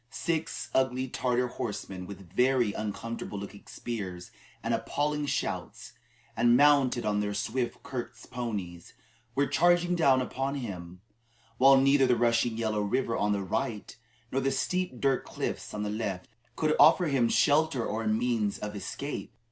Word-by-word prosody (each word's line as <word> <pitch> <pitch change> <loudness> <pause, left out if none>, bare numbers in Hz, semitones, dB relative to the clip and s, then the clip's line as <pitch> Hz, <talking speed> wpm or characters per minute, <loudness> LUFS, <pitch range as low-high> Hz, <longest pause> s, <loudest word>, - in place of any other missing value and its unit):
Six 165 +2 -3
ugly 130 0 +1
Tartar 125 0 0
horsemen 95 -6 -5
with 95 -4 -11
very 125 -4 +3
uncomfortable 110 0 -5
looking 100 0 -9
spears 95 -7 -6 0.3
and - - 0
appalling 150 0 -1
shouts, - - -3 0.4
and 120 0 +4
mounted 135 -4 +4
on 105 -1 +1
their 105 0 -2
swift 120 +4 -2
Kirghiz 120 -3 -6
ponies, 100 -8 -5 0.4
were 140 - +3
charging 175 +4 +3
down 140 -7 +4
upon 135 +2 -2
him, 90 -8 -6 0.6
while 135 +1 +8
neither 135 0 +4
the 125 - +4
rushing 115 0 +2
Yellow 110 -2 0
River 115 +3 0
on 105 0 +1
the 100 -1 0
right 105 +2 -3
hand, - - -16 0.4
nor 135 - 0
the 135 - +1
steep 140 +1 -1
dirt 135 -2 +1
cliffs - - -4
on 105 - -4
the 105 - -2
left, 100 -4 -3 0.3
could 155 -1 +1
offer 160 +5 +7
him 135 -6 +2
shelter 150 -3 +3
or 110 +1 -2
means 110 -2 +1
of 105 0 -6
escape. 140 +8 -5
120 Hz, 155 wpm, -29 LUFS, 105-135 Hz, 0.6 s, while